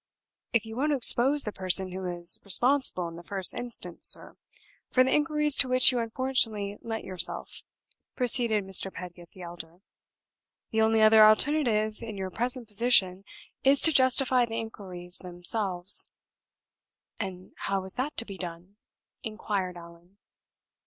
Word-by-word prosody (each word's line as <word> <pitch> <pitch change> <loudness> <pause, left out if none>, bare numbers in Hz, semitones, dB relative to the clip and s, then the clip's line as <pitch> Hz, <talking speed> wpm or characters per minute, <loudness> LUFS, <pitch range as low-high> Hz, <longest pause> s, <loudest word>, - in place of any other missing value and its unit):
"If 230 -2 0
you 220 0 -9
won't 295 +4 0
expose 270 +2 +3
the 210 - -5
person 185 -1 +2
who 190 +1 -6
is 175 -1 0
responsible 240 -3 +2
in 165 0 -10
the - - -10
first 190 0 -2
instance, 230 -8 -4
sir, - - 0 0.5
for 255 - +3
the 260 - 0
inquiries 300 -1 +4
to 265 - +3
which 255 +1 +7
you 250 - -2
unfortunately 225 -4 -1
lent 225 -1 -6
yourself," 185 -2 -3 0.5
proceeded 235 -4 +3
Mr. 195 0 0
Pedgift 175 -1 -11
the 185 - -12
elder, 170 +1 -11 0.9
"the 220 - 0
only 220 0 +2
other 215 0 +7
alternative, 215 -2 +2
in 220 -3 -8
your 190 -1 -5
present 245 +3 -4
position, 200 -4 +2 0.4
is 275 +1 +4
to 325 - +3
justify 260 -2 +2
the 225 -1 -4
inquiries 185 -6 -8
themselves." 180 +1 -2 1.1
"And 185 -3 -7
how 195 -1 -3
is 190 - -6
that 270 +4 -4
to 230 - -2
be 195 -4 -10
done?" 175 +3 -9 0.4
inquired 200 -4 -4
Allan. 170 +3 -16
215 Hz, 145 wpm, -27 LUFS, 185-245 Hz, 1.1 s, which